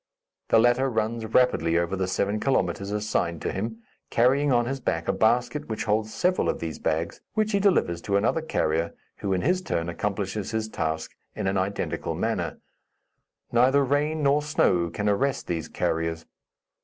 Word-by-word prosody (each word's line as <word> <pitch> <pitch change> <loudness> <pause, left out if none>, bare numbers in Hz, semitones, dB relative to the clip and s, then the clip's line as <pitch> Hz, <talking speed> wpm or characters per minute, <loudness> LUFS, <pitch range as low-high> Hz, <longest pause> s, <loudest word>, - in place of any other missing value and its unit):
The - - +5
latter 120 +4 +4
runs 110 0 -1
rapidly 85 -9 +3
over 85 +2 0
the 95 -1 -1
seven 100 +3 0
kilometres 100 -7 0
assigned 105 -5 -1
to - - -1
him, 110 +3 -4 0.3
carrying 135 +4 +3
on 120 -1 +3
his 135 +2 -3
back 85 -9 -2
a - - +2
basket 120 +6 +1
which 110 - -2
holds 110 0 0
several 180 +8 +1
of - - -1
these 80 -2 -5
bags, 80 +1 -2
which 215 -1 +1
he 200 - +2
delivers 175 - +2
to 100 +2 +1
another 115 +10 +1
carrier, 85 - -1 0.2
who, 100 - -3
in 95 -1 +1
his 185 +1 +1
turn, 85 - -2
accomplishes 100 +2 -3
his 110 -1 -2
task 80 -4 -3 0.2
in - - -3
an 95 0 +1
identical 100 +2 -2
manner. - - -2 0.9
Neither 130 +4 +4
rain 150 +3 0
nor 140 +1 +4
snow 90 - +2
can 105 +5 -3
arrest 130 +7 +1
these 85 -2 -3
carriers. 80 0 -2
110 Hz, 170 wpm, -26 LUFS, 90-130 Hz, 0.9 s, The